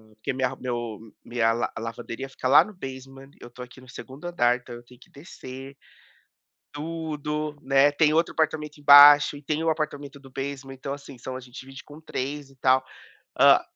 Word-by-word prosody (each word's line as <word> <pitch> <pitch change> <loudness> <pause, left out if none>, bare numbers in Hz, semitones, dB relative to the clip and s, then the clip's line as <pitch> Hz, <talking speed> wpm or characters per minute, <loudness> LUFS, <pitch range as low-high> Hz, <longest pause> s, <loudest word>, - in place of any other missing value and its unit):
porque 110 - -4
minha 130 0 0
ro - - -9
meu 120 -4 -4 0.3
minha 115 -2 +1
la 120 - -2
lavanderia 115 +3 -6
fica 130 - -4
lá 135 - +7
no 215 - -12
basement, 135 -4 -10
eu 120 - -10
tô 125 - -13
aqui 125 +1 -14
no 130 - -17
segundo 135 +5 -11
andar, 125 -9 +2
então, 125 -1 -12
eu 120 - -12
tenho 125 0 -18
que - - -20
descer 135 -3 -11 1.0
tudo, 150 -1 -4
né. 135 +1 +4
Tem 150 0 +3
outro 165 +1 +1
apartamento 155 -1 -2
embaixo 145 0 +8
e - - -12
tem 155 +2 -2
o 165 - +1
apartamento 145 -3 -4
do 135 -1 -16
basement, 135 0 -6
então 135 +1 -6
assim, 140 -2 -11
são 130 +1 -7
a - - -5
gente 125 0 -12
divide 135 0 -12
com 150 +2 -14
3 140 -1 -5
e 135 - -21
tal. 130 0 +3 0.6
Ah, - - +6
135 Hz, 195 wpm, -25 LUFS, 130-150 Hz, 1.0 s, embaixo